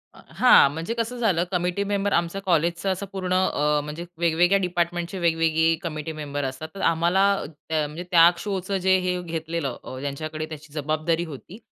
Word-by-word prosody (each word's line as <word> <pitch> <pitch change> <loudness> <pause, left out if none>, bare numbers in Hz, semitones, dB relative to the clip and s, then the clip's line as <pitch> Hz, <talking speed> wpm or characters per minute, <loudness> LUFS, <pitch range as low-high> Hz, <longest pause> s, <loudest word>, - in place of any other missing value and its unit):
हां, 250 - +5
म्हणजे 165 +8 -3
कसं 230 +2 -2
झालं 195 -8 +2
कमिटी 180 +2 0
मेंबर 200 0 -1 0.3
कॉलेजचं 175 +1 +1
असं 190 +2 -3
पूर्ण 185 -2 -2
अ, 150 -5 +2
म्हणजे 150 +3 -6
वेगवेगळ्या 175 +3 +3
डिपार्टमेंटचे 175 0 -2
वेगवेगळी 165 -1 +2
कमिटी 155 -2 -4
मेंबर 145 -2 -4
असतात. 135 +4 -5
तर 195 - -6
आम्हाला, 170 +4 +2 0.5
म्हणजे 155 +2 -1
त्या 170 -1 +8
शोचं 195 0 -2
जे 190 0 +5
हे 180 -1 -1
घेतलेलं, 165 -5 -4 0.2
ज्यांच्याकडे 155 +3 -4
त्याची 150 -1 -10
जबाबदारी 155 +3 -1
होती. 160 +5 -10
170 Hz, 150 wpm, -24 LUFS, 155-185 Hz, 0.5 s, त्या